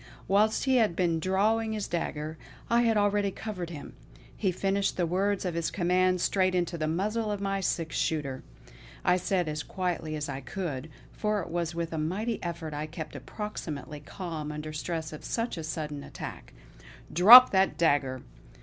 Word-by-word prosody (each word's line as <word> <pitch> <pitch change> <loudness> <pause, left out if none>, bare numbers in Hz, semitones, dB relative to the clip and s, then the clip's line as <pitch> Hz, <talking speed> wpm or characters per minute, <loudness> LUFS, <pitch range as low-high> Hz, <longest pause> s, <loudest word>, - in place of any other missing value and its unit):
Whilst 210 +3 +3
he 265 -1 +3
had 215 -7 +3
been 170 -3 +1
drawing 215 +5 +1
his 210 -2 -3
dagger, 155 -2 -3 0.4
I 235 0 +5
had 225 -2 +3
already 205 0 +2
covered 190 -4 -5
him; 150 -4 -8 0.4
he 195 -3 0
finished 195 +2 0
the 175 - +2
words 195 +3 0
of 180 - -1
his 165 -1 -1
command 185 0 +2
straight 185 -1 +2
into 175 -1 0
the 155 -2 -2
muzzle 210 +7 -1
of 205 - -2
my 195 0 -1
six 165 -3 -1
shooter. 140 -5 -1 0.6
I 180 0 +4
said 180 -1 0
as 150 0 -2
quietly 175 -4 -3
as 150 -1 -3
I 135 - -5
could, 150 -1 -5 0.2
for 210 -1 -1
it 170 - -7
was 170 0 -2
with 170 -1 -3
a 160 - -2
mighty 200 +9 -2
effort 170 -3 -5
I 150 +1 -3
kept 160 -1 -7
approximately 150 - -6
calm 155 -1 -6
under 150 0 -6
stress 160 0 -4
of 155 - -9
such 230 +1 -2
a 165 - -5
sudden 150 -2 -4
attack: - - -8 0.6
"Drop 230 +10 +10
that 190 -5 +2
dagger! 145 -6 +1
175 Hz, 175 wpm, -28 LUFS, 155-200 Hz, 0.6 s, Drop